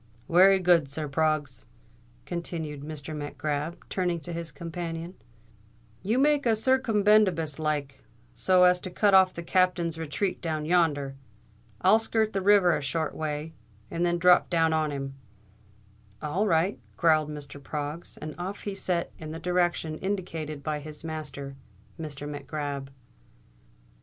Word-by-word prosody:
"Wery 190 +3 +6
good, 175 -6 +3
sir. 150 +2 -3
Proggs," 145 - -1 0.6
continued 160 -4 -5
Mr. 155 +1 -6
Mac 145 -1 -6
Grab, 150 +2 -3
turning 180 -2 -1
to 170 +3 -6
his 165 -1 -5
companion, 165 +2 -5 0.9
"you 220 +5 0
make 285 -1 +3
a 225 - +4
circumbendibus 210 - +3
like, 150 -3 -2 0.3
so 185 -1 +4
as 180 0 +5
to 185 - -6
cut 200 +3 +2
off 190 -1 +7
the 170 - -7
Captain's 175 -2 +1
retreat 165 +5 -2
down 155 -3 -2
yonder. 150 -5 +1 0.6
I'll 205 +4 +6
skirt 220 -1 0
the 195 - 0
river 195 -3 +5
a - - -2
short 155 +3 -2
way, 155 +1 -4 0.4
and 170 - -1
then 175 0 +2
drop 180 +1 +5
down 165 -2 +2
on 155 -1 +1
him.". 135 -1 -4 1.1
"All 180 +8 -1
right," 170 +2 +2 0.2
growled 155 -3 +3
Mr. 145 -1 -7
Proggs; 150 +3 -5
and 155 0 -6
off 190 +3 -5
he 205 - -3
set 180 -3 -1
in 155 - -7
the 160 +1 -6
direction 175 -2 0
indicated 165 -7 -4
by 150 0 -2
his 150 +1 -8
master, 150 -4 -6 0.4
Mr. 145 -2 -6
Mac 145 -1 -7
Grab. 145 -3 -4
165 Hz, 145 wpm, -27 LUFS, 150-180 Hz, 1.1 s, off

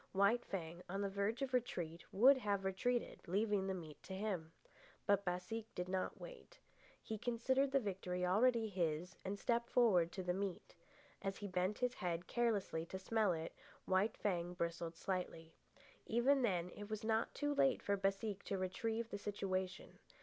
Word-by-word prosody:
White 200 +5 +4
Fang, 170 -2 -5
on 195 +2 -2
the 200 - -1
verge 205 +6 0
of 260 -1 -3
retreat, 175 -9 -1
would 260 +7 +7
have 200 -4 0
retreated, 235 +6 0
leaving 200 +1 +1
the 190 - 0
meat 155 -5 -8
to 190 - -7
him. 190 -6 -2 0.5
But 200 0 +4
Baseek 190 +5 -2
did 180 0 -2
not 185 0 -2
wait. - - -10 0.5
He 220 -1 -4
considered 260 +4 +2
the 275 - +4
victory 180 -4 -2
already 225 +4 +4
his 170 -3 -1
and 195 +1 -2
stepped 235 +3 +1
forward 185 -9 +4
to 190 - -3
the 180 0 +1
meat. 195 -1 -3 0.5
As 195 0 -2
he 205 - -5
bent 185 +2 0
his 250 0 +1
head 175 -3 -2
carelessly 210 -9 0
to 190 - -4
smell 210 +1 +2
it, 165 -1 -3 0.3
White 190 +3 +2
Fang 180 -3 -1
bristled 170 -1 -2
slightly. 165 -3 -3 0.5
Even 260 +4 +4
then 180 -7 +1
it 205 0 -8
was 215 +1 -3
not 220 0 +1
too 290 0 0
late 275 -2 +3
for 200 - +2
Baseek 195 +1 -1
to 195 - -1
retrieve 225 +5 -1
the 200 - -3
situation. 190 -2 -3
195 Hz, 170 wpm, -39 LUFS, 180-225 Hz, 0.5 s, would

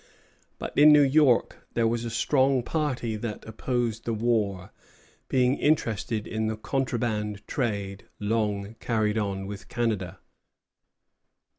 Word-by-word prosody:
But - - -6
in 150 +1 +8
New 150 -1 +7
York 140 -3 +3 0.2
there 115 -1 +3
was 115 +1 -1
a - - -2
strong 130 +2 +2
party 130 -7 -2
that 105 -1 -5
opposed 115 0 -2
the 115 - -2
war, 105 -5 0 0.6
being 130 +1 +2
interested 115 -7 0
in 110 0 -2
the 110 0 -2
contraband 110 -5 -2
trade 100 -6 -3
long 105 -1 -1
carried 110 -2 0
on 100 -2 -2
with 100 +1 -8
Canada. 105 -6 -2
115 Hz, 125 wpm, -27 LUFS, 105-125 Hz, 0.6 s, in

